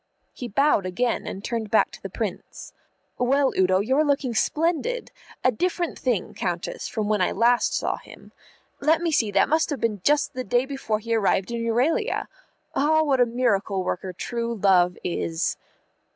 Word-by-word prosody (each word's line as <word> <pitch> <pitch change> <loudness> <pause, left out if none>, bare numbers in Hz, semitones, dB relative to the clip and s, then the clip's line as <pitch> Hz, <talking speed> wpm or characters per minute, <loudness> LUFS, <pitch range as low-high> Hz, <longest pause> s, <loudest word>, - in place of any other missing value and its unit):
He 245 - -6
bowed 240 -4 +2
again, 230 +7 -1
and 195 - -6
turned 230 -3 -3
back 220 - +3
to - - -12
the - - -6
Prince. - - -6 0.5
"Well, 270 +2 +2
Udo, 185 0 +3
you're 265 +8 +2
looking 280 -4 0
splendid. 340 - 0 0.3
A 255 - +4
different 345 +7 -2
thing, 240 -8 -1
Countess, 175 -2 -3
from 215 -3 -3
when 210 -2 +1
I 180 - +2
last 240 +1 +2
saw - - -1
him. - - -15 0.5
Let 320 +3 +2
me 335 - +1
see, 225 -8 +2
that - - +3
must 315 +2 +2
have 290 - -3
been 215 -4 -1
just 295 0 +2
the 255 - -4
day 245 +1 +1
before 270 -6 -2
he 230 +2 -3
arrived 200 -1 +1
in 235 -1 -2
Euralia. 240 +7 0 0.5
Ah, 315 +3 +3
what 275 -4 +2
a 245 - +5
miracle 205 -5 0
worker 185 +1 -3
True 235 +5 -3
Love 185 -3 +3
is!" 165 -1 -1
235 Hz, 175 wpm, -24 LUFS, 200-280 Hz, 0.5 s, a